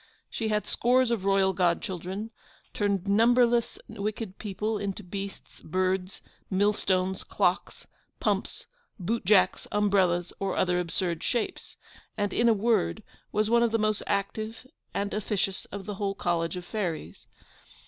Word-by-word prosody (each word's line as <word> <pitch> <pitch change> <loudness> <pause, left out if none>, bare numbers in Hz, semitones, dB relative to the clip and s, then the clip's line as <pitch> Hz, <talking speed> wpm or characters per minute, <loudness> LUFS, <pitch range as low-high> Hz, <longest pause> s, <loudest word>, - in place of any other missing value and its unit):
She 225 - -2
had 210 -1 0
scores 250 0 +3
of 215 -5 -1
royal 195 -1 +3
godchildren; 185 +3 -1 0.4
turned 200 -2 0
numberless 235 +3 +4
wicked 210 -1 -4
people 210 +1 -2
into 200 0 -4
beasts, 195 +2 -7
birds, 185 +2 -1 0.3
millstones, 190 -1 +1
clocks, - - 0 0.3
pumps, - - -1 0.3
boot 225 +4 -2
jacks, 190 -1 +4
umbrellas, 190 -4 +2
or 195 - -1
other 180 -1 +2
absurd 175 -1 -1
shapes; 235 -2 -2 0.4
and, 205 -1 0
in 235 0 +4
a - - +7
word, 205 - +1 0.3
was 215 0 +1
one 235 +1 +4
of 235 - +4
the 225 - +3
most 215 -1 +1
active 215 +4 -2 0.3
and 200 +1 -2
officious 200 -2 -1
of 200 -1 -7
the 210 - -4
whole 195 0 -2
College 170 -2 0
of 180 -1 -6
fairies. 170 - -4
200 Hz, 140 wpm, -28 LUFS, 185-215 Hz, 0.4 s, a